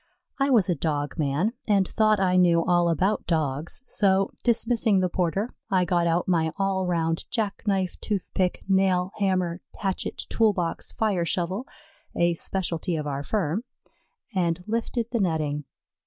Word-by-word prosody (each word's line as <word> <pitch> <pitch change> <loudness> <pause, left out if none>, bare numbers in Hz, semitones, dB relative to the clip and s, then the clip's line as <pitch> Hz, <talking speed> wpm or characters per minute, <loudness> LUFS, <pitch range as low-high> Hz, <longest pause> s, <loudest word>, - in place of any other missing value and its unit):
I 275 +1 +2
was 230 -8 +4
a 180 - +2
dog 150 0 -2
man 155 +9 +1
and 200 -3 +3
thought 215 -1 +2
I 185 -1 +2
knew 170 -2 +4
all 175 -1 +3
about 190 +5 0
Dogs, 155 - -1
so, 195 -4 +2
dismissing 230 -3 +2
the 185 -1 +1
porter, 185 +4 0 0.2
I 185 -2 +2
got 175 0 +1
out 170 +1 +1
my 165 -3 +2
all 195 -2 0
round 165 -2 -1
jackknife 200 -4 -1
toothpick 190 -3 -1
nailhammer 185 -1 +1 0.2
hatchet 195 -2 -3
toolbox 200 -7 0
fire 205 -6 0
shovel, 185 +9 -2 0.5
a 170 0 +3
specialty 175 0 -2
of 155 -2 -3
our 140 -1 -2
firm, 190 +4 -1 0.7
and 175 -2 0
lifted 230 +1 -1
the 235 - 0
netting. 155 -6 -1
185 Hz, 140 wpm, -26 LUFS, 170-200 Hz, 0.7 s, was